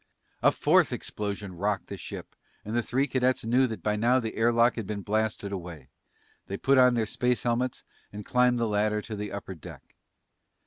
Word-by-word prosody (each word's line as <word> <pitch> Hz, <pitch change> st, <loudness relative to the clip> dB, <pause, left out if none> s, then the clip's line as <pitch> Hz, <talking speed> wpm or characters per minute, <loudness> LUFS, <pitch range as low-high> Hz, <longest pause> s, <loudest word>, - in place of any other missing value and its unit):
A -, -, +5 dB
fourth -, -, +3 dB
explosion 100 Hz, -2 st, -4 dB
rocked 100 Hz, +1 st, -1 dB
the -, -, -7 dB
ship -, -, -8 dB, 0.3 s
and 110 Hz, +2 st, -4 dB
the 120 Hz, -, +3 dB
three 130 Hz, +4 st, 0 dB
cadets 130 Hz, -3 st, 0 dB
knew 125 Hz, +3 st, +3 dB
that 110 Hz, -7 st, -7 dB
by 105 Hz, 0 st, +1 dB
now 120 Hz, +4 st, +3 dB
the 110 Hz, -3 st, -4 dB
air 115 Hz, +1 st, +3 dB
lock 115 Hz, +1 st, +4 dB
had 115 Hz, -4 st, -5 dB
been 105 Hz, -2 st, -4 dB
blasted 110 Hz, -1 st, -1 dB
away. 85 Hz, -8 st, -7 dB, 0.6 s
They 100 Hz, -, -4 dB
put 135 Hz, +4 st, +3 dB
on 125 Hz, -1 st, +6 dB
their 115 Hz, -2 st, +1 dB
space 125 Hz, +3 st, 0 dB
helmets 120 Hz, +1 st, -1 dB, 0.3 s
and 105 Hz, 0 st, -8 dB
climbed 125 Hz, 0 st, +3 dB
the 115 Hz, -, +1 dB
ladder 105 Hz, 0 st, 0 dB
to 110 Hz, -, -6 dB
the 105 Hz, -1 st, -5 dB
upper 100 Hz, -1 st, -6 dB
deck. 80 Hz, -, -12 dB
110 Hz, 195 wpm, -28 LUFS, 105-125 Hz, 0.6 s, on